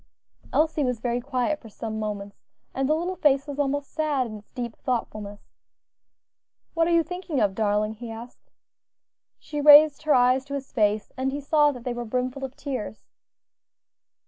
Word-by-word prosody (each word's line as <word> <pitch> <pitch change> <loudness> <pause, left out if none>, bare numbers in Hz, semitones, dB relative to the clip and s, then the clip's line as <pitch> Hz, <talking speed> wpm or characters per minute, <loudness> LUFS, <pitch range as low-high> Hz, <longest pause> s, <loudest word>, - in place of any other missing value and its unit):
Elsie 310 -1 +2
was 250 -3 -1
very 240 +1 -1
quiet 270 +3 -1
for 225 - -12
some 220 +1 -5
moments, 205 -2 -5 0.3
and 270 +1 -1
the 310 - +4
little 355 +3 -3
face 275 -2 +3
was 285 -1 -7
almost 285 0 -1
sad 300 -4 0
in 215 -2 -7
its 205 - -23
deep 240 -3 -5
thoughtfulness. 215 -5 -4 1.3
"What 330 -1 +2
are - - +1
you 335 -1 +4
thinking 355 -3 -4
of, 200 -2 +2
darling?" 210 +1 0
he 230 +2 -9
asked. 230 +2 -10 0.9
She 295 -1 -5
raised 295 0 +8
her 305 -2 +3
eyes 255 +1 +4
to 280 0 -5
his 275 -1 -6
face 210 -3 +1
and 265 +1 -1
he 285 - -3
saw 295 +1 +3
that 250 -4 -9
they 245 - -2
were 240 0 -4
brimful 255 +3 -3
of 265 0 -5
tears. 255 -7 -5
260 Hz, 175 wpm, -25 LUFS, 225-290 Hz, 1.3 s, raised